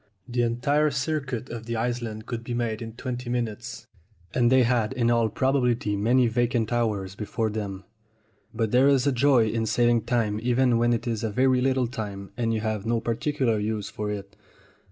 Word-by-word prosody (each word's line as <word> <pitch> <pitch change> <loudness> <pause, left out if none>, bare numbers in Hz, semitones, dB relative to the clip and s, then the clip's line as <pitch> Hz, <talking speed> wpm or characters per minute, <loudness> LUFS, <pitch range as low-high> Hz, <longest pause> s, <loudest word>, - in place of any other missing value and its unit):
The 120 0 -1
entire 135 +6 +2
circuit 140 -4 -3
of 115 -1 -7
the 115 - -2
island 115 -2 -3
could 115 -1 -5
be 120 0 -4
made 115 -2 -2
in 115 -1 -6
twenty 125 0 -5
minutes, 120 +1 -4 0.5
and 120 -1 +3
they 130 -1 +6
had 120 -1 +1
in 120 -2 +1
all 115 -1 +2
probability 125 -3 +1
many 120 +5 +3
vacant 120 0 0
hours 105 -5 -1
before 110 +2 -2
them. 100 -3 -5 0.7
But 110 -2 -1
there 130 +2 +5
is 135 -2 +3
a 140 - +3
joy 130 -2 +4
in 110 0 -1
saving 120 -1 +2
time 110 -4 0
even 125 0 +2
when 120 0 +3
it 120 +1 0
is 115 -3 -2
a 110 - 0
very 130 +4 +2
little 130 -1 +2
time 100 -5 -6
and 115 -2 0
you 110 -1 -1
have 110 -2 -2
no 115 +1 0
particular 120 0 0
use 105 -1 -2
for 105 0 -4
it. 100 -1 -6
120 Hz, 190 wpm, -26 LUFS, 110-125 Hz, 0.7 s, they